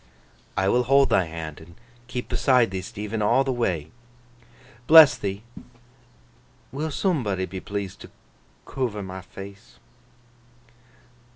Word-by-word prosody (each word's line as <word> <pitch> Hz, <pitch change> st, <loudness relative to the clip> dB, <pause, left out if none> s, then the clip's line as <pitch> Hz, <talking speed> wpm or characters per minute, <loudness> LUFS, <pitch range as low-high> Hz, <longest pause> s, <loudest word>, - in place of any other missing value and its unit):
'I 95 Hz, 0 st, +2 dB
will 125 Hz, +3 st, +3 dB
hold 135 Hz, +2 st, +4 dB
thy 95 Hz, -, +3 dB
hand, 80 Hz, -2 st, -7 dB
and 85 Hz, +2 st, -15 dB, 0.3 s
keep 125 Hz, 0 st, -5 dB
beside 125 Hz, -6 st, +2 dB
thee, 95 Hz, -1 st, -3 dB
Stephen, 105 Hz, +2 st, -5 dB
all 120 Hz, +6 st, +3 dB
the 135 Hz, -, -1 dB
way.' 90 Hz, -, -2 dB, 1.0 s
'Bless 160 Hz, -3 st, +9 dB
thee! 100 Hz, +1 st, -5 dB, 1.3 s
Will 150 Hz, +5 st, -3 dB
soombody 125 Hz, -, -1 dB
be 95 Hz, +1 st, -7 dB
pleased 100 Hz, 0 st, -6 dB
to -, -, -11 dB, 0.6 s
coover 110 Hz, -7 st, -3 dB
my 95 Hz, 0 st, -7 dB
face! 95 Hz, -8 st, -12 dB
100 Hz, 120 wpm, -24 LUFS, 95-125 Hz, 1.3 s, Bless